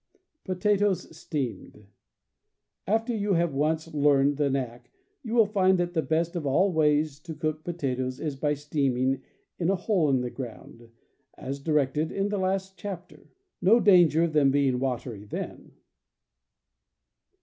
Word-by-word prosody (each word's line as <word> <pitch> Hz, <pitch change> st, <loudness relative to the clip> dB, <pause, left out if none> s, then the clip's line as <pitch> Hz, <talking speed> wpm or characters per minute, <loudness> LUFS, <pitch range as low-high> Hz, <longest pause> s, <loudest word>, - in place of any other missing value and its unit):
Potatoes, 195 Hz, -2 st, 0 dB
Steamed. 135 Hz, -9 st, -5 dB, 0.5 s
— -, -, -52 dB
After 225 Hz, +1 st, -4 dB
you 205 Hz, -1 st, 0 dB
have 170 Hz, -2 st, +1 dB
once 155 Hz, +3 st, -1 dB
learned 145 Hz, -1 st, +3 dB
the 145 Hz, -1 st, +1 dB
knack, 125 Hz, -3 st, -4 dB, 0.3 s
you 235 Hz, -3 st, -4 dB
will 225 Hz, -2 st, +6 dB
find 190 Hz, -2 st, +3 dB
that 175 Hz, 0 st, -1 dB
the 160 Hz, -, +1 dB
best 165 Hz, +2 st, -1 dB
of 170 Hz, -, -2 dB
all 175 Hz, +8 st, +2 dB
ways 150 Hz, -2 st, +2 dB
to 160 Hz, 0 st, -8 dB
cook 155 Hz, 0 st, -3 dB
potatoes 130 Hz, -7 st, -3 dB
is 150 Hz, -3 st, -3 dB
by 145 Hz, +2 st, 0 dB
steaming 135 Hz, -3 st, 0 dB, 0.4 s
in 170 Hz, 0 st, +1 dB
a 195 Hz, -, +3 dB
hole 185 Hz, -4 st, +1 dB
in 130 Hz, -2 st, +2 dB
the 125 Hz, -1 st, -4 dB
ground, 120 Hz, -2 st, -9 dB, 0.5 s
as 135 Hz, +2 st, -6 dB
directed 150 Hz, +1 st, 0 dB
in 200 Hz, +1 st, -1 dB
the 205 Hz, -1 st, -1 dB
last 190 Hz, 0 st, -2 dB
chapter. 185 Hz, -3 st, -8 dB, 0.3 s
No 225 Hz, +6 st, +5 dB
danger 175 Hz, -6 st, +5 dB
of 165 Hz, -2 st, -1 dB
them 145 Hz, -3 st, +4 dB
being 135 Hz, -2 st, +2 dB
watery 125 Hz, -5 st, -3 dB
then. 105 Hz, -, -7 dB
155 Hz, 150 wpm, -27 LUFS, 135-185 Hz, 0.5 s, will